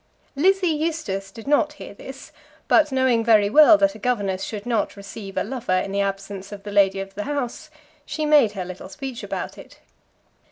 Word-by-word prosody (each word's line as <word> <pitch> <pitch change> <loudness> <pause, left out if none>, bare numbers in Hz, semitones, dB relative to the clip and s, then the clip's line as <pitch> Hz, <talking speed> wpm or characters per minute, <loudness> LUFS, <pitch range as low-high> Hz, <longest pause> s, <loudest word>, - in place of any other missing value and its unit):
Lizzie 370 +4 +3
Eustace 295 -12 -3
did 225 +3 -12
not 300 +1 +2
hear 295 - -10
this; 265 +6 -11 0.4
but 305 -2 +4
knowing 260 -3 +2
very 215 -3 +4
well 310 +3 +8
that 295 -1 +2
a - - -12
governess 205 -5 -1
should 210 -2 -6
not 230 -4 -1
receive 195 0 -9
a - - +2
lover 225 -5 -2
in 195 - -2
the 200 0 0
absence 195 0 -4
of 200 -1 -9
the 205 - -7
lady 195 -1 +3
of 195 0 -6
the 205 +1 -5
house, 285 +1 -4 0.3
she 310 +1 -3
made 290 -8 +5
her 190 -3 -4
little 185 +1 -9
speech 245 +6 -7
about - - -5
it. - - -14
225 Hz, 195 wpm, -23 LUFS, 195-290 Hz, 0.4 s, well